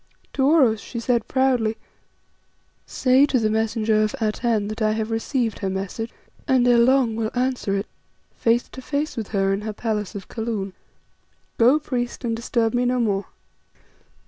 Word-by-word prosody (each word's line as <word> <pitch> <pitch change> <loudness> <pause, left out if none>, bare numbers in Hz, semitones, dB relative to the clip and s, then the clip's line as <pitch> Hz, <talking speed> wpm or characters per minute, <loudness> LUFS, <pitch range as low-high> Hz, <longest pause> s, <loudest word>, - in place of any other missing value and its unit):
To 265 - 0
Oros 265 -9 +4
she 235 - -6
said 235 -1 0
proudly 250 -4 +1 1.1
"Say 260 +2 +3
to 270 - +1
the 220 -2 +1
messenger 220 0 +1
of 215 0 0
Atene 220 -1 0
that 215 +2 -6
I 215 0 +2
have 220 0 -2
received 225 0 -1
her 195 - -2
message, 195 +4 -4 0.4
and 255 -2 +3
ere 240 -1 +5
long 250 -1 +3
will 220 -1 -1
answer 250 -5 0
it, 200 +1 -1 0.5
face 235 +1 +1
to 260 - -9
face 290 +3 -2
with 225 -5 -4
her 195 -2 +1
in 195 - -2
her 215 0 -4
palace 210 -3 -3
of 195 -2 -7
Kaloon. 220 -4 -4 0.9
Go, 245 +6 +6
priest, 250 -5 -3
and 230 -1 0
disturb 230 -1 0
me 245 0 +1
no 250 0 +1
more." 200 -4 0
230 Hz, 170 wpm, -23 LUFS, 215-250 Hz, 1.1 s, Go